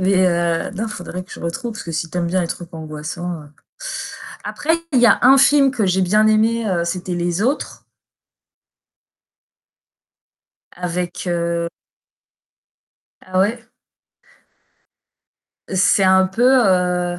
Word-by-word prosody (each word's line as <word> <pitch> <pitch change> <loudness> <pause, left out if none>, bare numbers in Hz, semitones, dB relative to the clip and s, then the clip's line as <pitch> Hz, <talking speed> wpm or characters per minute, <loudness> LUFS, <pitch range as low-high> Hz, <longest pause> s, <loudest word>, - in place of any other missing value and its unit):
Mais, 185 0 +3
heu, 170 -1 0
non, 220 +3 -3
faudrait 180 -2 -7
que - - -14
je - - -10
retrouve 225 +8 -4
parce 215 - -8
que 165 - -6
si 165 +1 -3
tu 180 - -3
aimes 170 - 0
bien 185 +2 0
les 170 - -2
trucs 175 0 -7
angoissants. 160 +1 -6 1.0
Après 320 +2 0 0.2
il 255 - +4
y 240 - +6
a - - +5
un 265 +2 +7
film 275 0 +5
que 225 -6 -1
j'ai 190 +1 +2
bien 210 +4 +3
aimé, 220 +1 +2
heu, 175 -3 0
c'était 180 +1 -3
Les 175 +2 -1
Autres. 270 +6 -2 2.9
Avec, 180 0 -4
heu 170 -1 -1 1.5
Ah 185 0 -3
ouais. 210 +5 +2 2.1
C'est 190 +1 +3
un 190 0 +5
peu, 190 +6 -3 0.2
heu 180 -1 +1
180 Hz, 135 wpm, -19 LUFS, 170-215 Hz, 2.9 s, un